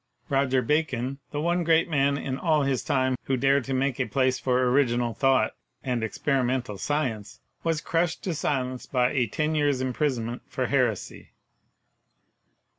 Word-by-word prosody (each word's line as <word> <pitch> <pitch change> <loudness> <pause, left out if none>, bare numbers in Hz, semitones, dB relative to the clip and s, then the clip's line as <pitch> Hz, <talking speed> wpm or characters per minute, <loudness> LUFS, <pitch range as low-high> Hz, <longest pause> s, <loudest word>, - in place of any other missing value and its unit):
Roger 135 -2 +2
Bacon, 135 -2 -1
the 145 - -4
one 175 +3 +1
great 165 0 +3
man 140 -3 +2
in 135 -2 -3
all 155 0 +2
his 135 -2 0
time 130 -1 +1
who 135 - 0
dared 135 +1 +3
to 135 - -5
make 135 0 0
a 130 - 0
place 130 +3 +1
for 125 -1 +1
original 120 -3 +2
thought 135 -4 +2 0.3
and 125 -4 -1
experimental 125 -3 -1
science, 130 -9 -2 0.2
was 165 -2 0
crushed 165 +1 -1
to 180 - -1
silence 130 -4 -2
by 125 -1 +1
a 125 -5 +1
ten 155 +8 -1
years' 145 -3 +1
imprisonment 125 -2 -1
for - - -2
heresy. - - -1
135 Hz, 155 wpm, -26 LUFS, 125-150 Hz, 0.3 s, great